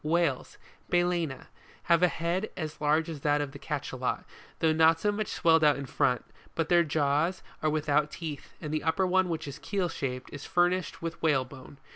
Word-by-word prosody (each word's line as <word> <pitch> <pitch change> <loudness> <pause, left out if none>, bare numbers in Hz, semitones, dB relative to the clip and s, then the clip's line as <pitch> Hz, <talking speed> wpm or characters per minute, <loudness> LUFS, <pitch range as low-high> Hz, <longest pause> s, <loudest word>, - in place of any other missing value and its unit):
WHALES, 160 -4 0 0.3
MalcEna, 175 -6 +1 0.4
have 170 -1 +3
a 180 - +6
head 175 +5 -2
as 155 -3 -5
large 155 +2 +2
as 160 -3 -5
that 145 0 +2
of 145 -2 -2
the - - -10
Cachalot, - - -3 0.3
though 160 -1 +3
not 160 +1 +5
so 205 +5 +1
much 210 0 -2
swelled 160 -1 +3
out 150 -2 +6
in 140 - -5
front; 125 -2 +1 0.3
but 165 -1 -1
their 175 -1 +5
jaws 150 +3 +1 0.2
are 155 - +2
without 150 -1 +1
teeth, 155 -3 -7
and 155 -2 -5
the 155 - 0
upper 160 +4 +1
one 185 0 +2
which 160 -3 -3
is 140 - -7
keel 195 -4 -1
shaped, 130 -4 -4
is 145 - -7
fur 175 0 +3
nished 185 -1 -4
with 165 0 -5
whalebone. 135 -3 -1
160 Hz, 195 wpm, -29 LUFS, 145-175 Hz, 0.4 s, a